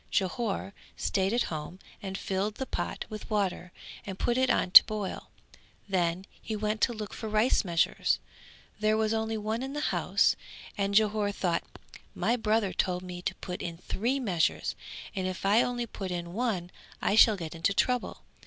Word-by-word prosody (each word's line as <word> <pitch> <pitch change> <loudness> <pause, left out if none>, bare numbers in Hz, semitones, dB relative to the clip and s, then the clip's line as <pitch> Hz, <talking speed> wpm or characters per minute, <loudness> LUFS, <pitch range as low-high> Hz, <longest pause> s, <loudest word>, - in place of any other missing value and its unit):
Jhore 200 -1 -1 0.2
stayed 190 0 +1
at 240 +1 +2
home 155 +4 -5 0.2
and 195 -1 -4
filled 195 +3 -2
the 265 - -3
pot - - -3
with 215 -2 -8
water 195 -4 -1 0.3
and 195 -2 -6
put 240 - +1
it 260 +1 +2
on 180 - +2
to - - +13
boil; 215 -3 -4 0.6
then 180 -1 0 0.2
he 220 - -4
went 215 +1 -1
to - - +4
look 215 -2 -6
for 220 - -5
rice 215 +4 +3
measures; 170 -3 +1 0.6
there 215 0 +2
was 220 0 +1
only 220 0 -1
one 215 +2 -2
in 265 +1 -4
the 295 - -2
house - - +3 0.4
and 200 0 -1
Jhore 210 -1 +3
thought 175 -4 0 0.5
"My 210 +7 +1
brother 220 -3 +1
told 180 -1 0
me 180 -1 -7
to - - -2
put 180 -2 -6
in 170 -2 -5
three 235 +9 -1
measures 185 -10 0 0.4
and 190 -1 -1
if 185 +1 -4
I 210 +4 +5
only 245 -1 -1
put 195 -4 -6
in 175 -1 -4
one 200 -6 -1 0.3
I - - +1
shall 220 -1 +7
get 165 -3 -6
into 165 +4 +1
trouble." 250 +5 0
205 Hz, 180 wpm, -29 LUFS, 185-220 Hz, 0.6 s, to